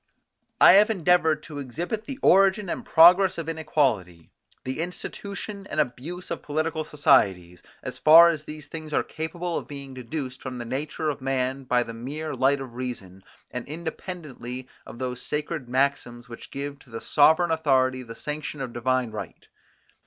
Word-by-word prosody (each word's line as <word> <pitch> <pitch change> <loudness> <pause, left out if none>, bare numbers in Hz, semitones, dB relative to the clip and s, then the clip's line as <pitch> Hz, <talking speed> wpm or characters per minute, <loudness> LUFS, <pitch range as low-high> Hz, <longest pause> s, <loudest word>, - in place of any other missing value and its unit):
I - - +9
have 205 +2 +6
endeavoured 170 -5 +2
to 150 -2 -8
exhibit 170 - -4
the 275 -2 -6
origin 195 +1 +4
and - - -3
progress 180 +3 +6
of 165 -2 -5
inequality, 135 - -1 0.3
the 130 +3 -4
institution 200 +3 -6
and - - -3
abuse 150 +6 -3
of - - -3
political 155 +1 -2
societies, 95 - +2 0.2
as - - -6
far 165 +2 +8
as 155 -3 -5
these 150 -1 -8
things 155 -1 -8
are - - +2
capable 170 +2 -4
of - - -12
being 140 -2 -8
deduced 130 +1 -6
from 130 -1 -6
the 120 - -6
nature 150 +5 -2
of 140 - -9
man 135 0 -1
by 125 -1 +2
the 115 -1 -8
mere 145 +7 -5
light 135 +2 +2
of 130 -3 -8
reason, 110 -7 -7 0.3
and 125 -1 -6
independently 150 -5 -7 0.2
of - - -10
those 125 0 -4
sacred 150 -3 -4
maxims 125 -2 -1
which 115 -1 -10
give 140 0 -6
to 130 - -20
the 115 0 -6
sovereign 160 +3 +4
authority 130 -5 +2
the 115 -2 -10
sanction 150 0 -5
of 130 -3 -5
divine 125 -1 0
right. 110 - -8
145 Hz, 165 wpm, -25 LUFS, 125-160 Hz, 0.3 s, I